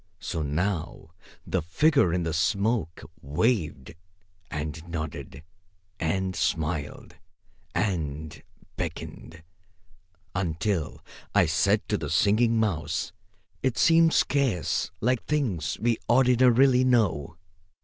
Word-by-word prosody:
So 80 - -4
now 80 +1 -2 0.4
the - - -1
figure 135 - +3
in 90 0 0
the 80 -1 -2
smoke 95 +1 0 0.2
waved, 75 - -1 0.6
and 75 +1 -4
nodded, 80 -3 -6 0.6
and 95 +3 -1
smiled 80 -2 -2 0.6
and 80 -6 -2 0.4
beckoned, 80 0 -6 0.9
until 90 -1 -2 0.3
I - - +6
said - - +1
to - - 0
the 75 -2 -4
Singing 110 +8 +3
Mouse 85 -7 -1 0.5
it 130 -3 0
seemed 165 0 +5
scarce 135 - +1
like 125 +1 +1
things 105 - -1
we 115 +1 +1
ordinarily 125 +1 +5
know. 100 - +1
90 Hz, 100 wpm, -26 LUFS, 80-120 Hz, 0.9 s, I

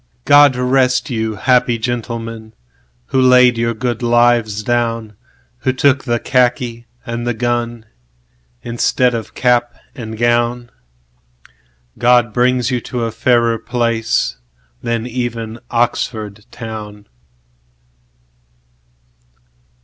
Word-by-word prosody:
God 145 -2 +6
rest 130 +1 +1
you, 110 -2 -2
happy 125 +1 +2
gentlemen, 115 -1 -5 0.5
Who 130 - +2
laid 125 -1 +6
your 115 0 0
good 120 +1 -3
lives 120 -3 +2
down, 115 -2 -1 0.4
Who 130 - 0
took 130 0 +2
the 120 -2 +1
khaki 120 -1 0 0.2
and 120 -1 -4
the 120 - -1
gunInstead 110 - -3
of 115 -1 -5
cap 120 -1 +1 0.2
and 110 -4 -7
gown. 120 +1 0 1.3
God 120 -2 +3
bring 125 +1 +2
you 125 0 -1
to 120 0 -4
a 115 - -2
fairer 115 0 +2
placeThan 110 - -3
even 120 -2 -4
Oxford 110 -3 -2
town. 105 -3 -8
120 Hz, 95 wpm, -17 LUFS, 110-125 Hz, 1.3 s, God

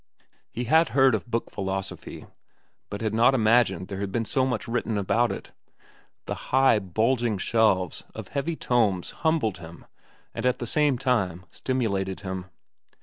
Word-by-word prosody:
He 120 - -4
had 160 +7 +4
heard 135 -2 +6
of 110 +2 -2
book 115 0 -2
philosophy, 95 0 -5 0.6
but 100 +1 -6
had 110 -1 -1
not 115 +4 +4
imagined 110 -6 +3
there 95 -2 -6
had 100 -1 -3
been 115 +2 -1
so 130 +3 +1
much 125 -5 -2
written 115 -2 -1
about 115 +4 +1
it. - - -7 0.7
The - - -3 0.2
high, 130 -4 +4
bulging 110 +4 0
shelves 95 -3 +1
of - - -8
heavy 145 +4 -2
tomes 110 - +1
humbled 150 - 0
him 85 0 -12 0.5
and 115 - -5
at 125 0 +2
the 120 - -4
same 145 +1 +2
time 95 -9 0
stimulated 100 -8 -2
him. 95 -2 -5
115 Hz, 155 wpm, -26 LUFS, 95-125 Hz, 0.7 s, heard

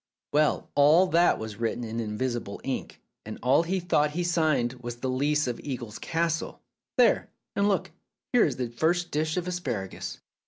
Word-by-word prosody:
"Well, 150 0 +2
all 150 +6 +6
that 175 -1 +4
was 110 -1 -6
written 115 +1 -2
in 115 0 -4
invisible 115 -1 -3
ink, 135 - -4 0.2
and 110 - -7
all 130 +5 +5
he 185 +3 -1
thought 150 -4 +2
he 175 - +1
signed 155 -8 +1
was 120 -1 -5
the 130 +2 -3
lease 145 +3 +1
of 125 -2 -3
Eagles 120 -6 -6
Castle. 165 -1 -1 0.4
There! - - +4 0.3
And 200 0 +2
look, 200 - 0 0.4
here 245 - +6
is - - +1
the 125 -2 -3
first 170 +8 0
dish 155 +2 0
of 180 0 -1
asparagus." 125 - -4
145 Hz, 170 wpm, -27 LUFS, 120-170 Hz, 0.4 s, all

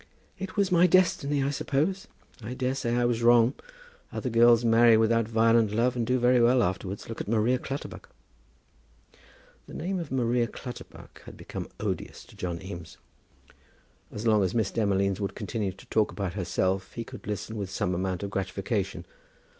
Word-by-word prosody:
"It 190 -1 -6
was 200 -2 +2
my 175 0 +5
destiny, 175 -6 +2
I 140 - 0
suppose; 155 +7 -1 0.3
I 115 +4 -6
daresay 130 -2 -1
I 120 0 +2
was 120 -1 0
wrong. 120 +1 +5 0.6
Other 125 - -3
girls 120 +1 +5
marry 115 0 +6
without 115 0 +2
violent 115 0 +3
love, 120 +4 +1
and 120 -2 -1
do 130 +1 +2
very 125 0 +4
well 120 +1 +4
afterwards. 95 +2 -3
Look 115 - -5
at - - -6
Maria 115 +3 +2
Clutterbuck." 135 +2 -7 1.6
The - - -10
name 185 +2 -2
of 165 -4 -6
Maria 120 -2 +1
Clutterbuck 120 +2 -10
had - - -11
become - - -7
odious - - -4
to - - -17
John 85 -2 -4
Eames. 85 -4 -9 1.1
As 105 +2 -6
long 110 -3 +4
as 95 +2 -1
Miss 110 -4 +1
Demolines 100 -3 +1
would 100 -1 -3
continue 105 -5 -3
to 95 - -16
talk 110 -1 +1
about 95 -4 -4
herself 95 0 -1
he 115 - -4
could - - -11
listen 105 +2 -4
with 100 -3 -4
some 90 -1 -1
amount 95 +1 -2
of 100 - -4
gratification. 95 -2 -3
115 Hz, 170 wpm, -27 LUFS, 100-125 Hz, 1.6 s, marry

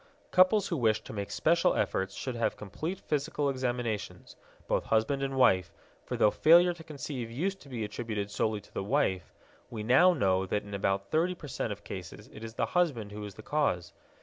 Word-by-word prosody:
Couples 185 +2 +4
who 170 - -1
wish 110 -4 +2
to - - -9
make 100 -2 -4
special 170 +2 +2
efforts 95 +1 -1
should 130 - -4
have 115 - 0
complete 155 - -5
physical 145 -1 -1
examinations, 120 -5 -3 0.3
both - - 0
husband 115 +5 +1
and 135 0 -2
wife, 95 -9 +4 0.3
for - - -3
though 105 - +5
failure 175 +2 +6
to 170 -1 -12
conceive 140 -6 -6
used 190 +11 -2
to 140 - -14
be 120 -4 -3
attributed 105 -2 -4
solely 110 0 -1
to - - -22
the - - -3
wife, 95 - 0 0.4
we 110 -3 -5
now 135 +11 +6
know 95 - +1
that 105 +2 -1
in 100 - -10
about 100 0 -1
thirty 175 +3 +2
percent 135 -8 -4
of 105 0 -7
cases 95 +3 -8
it 110 - -10
is 115 0 -7
the - - +1
husband 140 - +1
who 105 0 -7
is 100 -1 -9
the 110 - -11
cause. 105 - 0
120 Hz, 200 wpm, -30 LUFS, 105-150 Hz, 0.4 s, failure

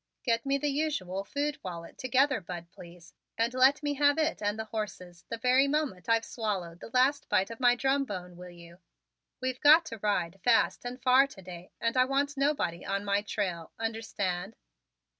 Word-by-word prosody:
Get 230 +1 0
me 275 0 +2
the 295 +1 -2
usual 275 - -2
food 285 +7 -3
wallet 170 -2 -8
together, 260 -1 +2
Bud, 170 -1 -8
please, 175 0 -14 0.2
and 230 +2 +1
let 265 +4 +4
me 290 0 0
have 285 +1 +3
it 315 -5 0
and 205 +1 -1
the 220 - -4
horses 180 -5 -6
the 230 - -3
very 255 +4 +3
moment 275 -11 -2
I've 230 0 +3
swallowed 190 -7 -4
the - - -10
last 260 +4 +2
bite 200 +1 +2
of 230 - -8
my 245 -1 +5
drum 270 +2 +1
bone, 180 -6 -7
will 180 +1 -10
you? 170 0 -14 0.6
We've 255 0 -3
got 310 +3 +7
to 225 -7 -7
ride 195 -3 -1
fast 240 0 +2
and 245 +1 -5
far 260 +2 +5
to 195 -8 -14
day 175 0 -10
and 230 +1 -1
I 255 0 +5
want 280 +2 0
nobody 275 - 0
on 200 +1 -2
my 200 0 +1
trail. 185 -6 -4
Understand?" 205 -4 -3
225 Hz, 190 wpm, -29 LUFS, 185-270 Hz, 0.6 s, got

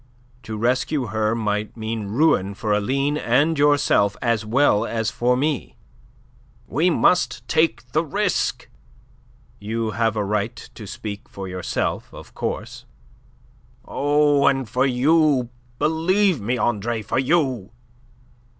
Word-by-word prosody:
To 110 -3 -6
rescue 125 +3 0
her 110 +1 0
might 105 -1 -2
mean 110 -1 -4
ruin 105 -5 +2
for 105 +1 -1
Aline 135 +8 0
and 145 +6 +2
yourself 145 -9 +3
as 115 -3 0
well 110 -1 +3
as 115 -1 -2
for 125 +1 +1
me." 145 +1 -2 0.9
"We 165 +6 +1
must 180 +1 +1
take 125 -7 0
the 155 - +1
risk." 200 +4 -1 0.9
"You 110 +1 -3
have 115 -1 0
a 105 -2 -1
right 105 0 -1 0.2
to - - -10
speak 105 -1 -7
for 95 -1 -7
yourself, 90 -1 -3
of - - -12
course." - - -5 1.0
"Oh, 145 0 +2
and 135 -3 +1
for 130 +5 +1
you, 135 0 +2 0.3
believe 165 - +2
me, 120 +5 -1
Andre, 115 -1 -1
for 115 +4 -1
you!" 130 - 0
125 Hz, 125 wpm, -22 LUFS, 110-145 Hz, 1.0 s, yourself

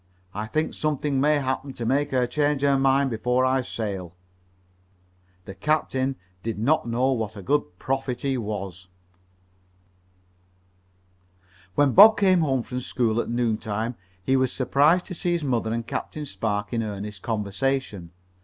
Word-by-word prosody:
I 105 +2 -4
think 155 +6 -1
something 145 -2 -1
may 150 +2 +4
happen 135 0 -2
to 120 - -5
make 140 +4 +1
her 130 -2 +2
change 145 +2 0
her 140 -1 +4
mind 135 0 +3
before 125 +3 +1
I 130 0 +2
sail." 100 -8 -5 1.3
The 95 - -8
captain 135 +3 0 0.3
did 115 0 -4
not 120 +4 +1
know 125 +3 +1
what 110 -4 -2
a 100 - -8
good 140 -9 0
prophet 130 0 -2
he 135 -1 0
was. 100 -5 -5 2.9
When 145 +1 +4
Bob 215 - +9
came 185 -3 +4
home 135 -5 +1
from 125 +1 -4
school 120 -2 0
that 120 - -1
noon 120 -2 0
time 110 +3 -3 0.3
he 130 - +2
was 130 -1 +2
surprised 145 +7 +3
to 185 - -6
see 175 0 -1
his 170 -2 -1
mother 120 -5 0
and 115 0 -2
Captain 150 +5 -4
Spark 105 -5 -3
in 115 - 0
earnest 105 -2 -5
conversation. 105 -2 -2
130 Hz, 155 wpm, -25 LUFS, 110-140 Hz, 2.9 s, Bob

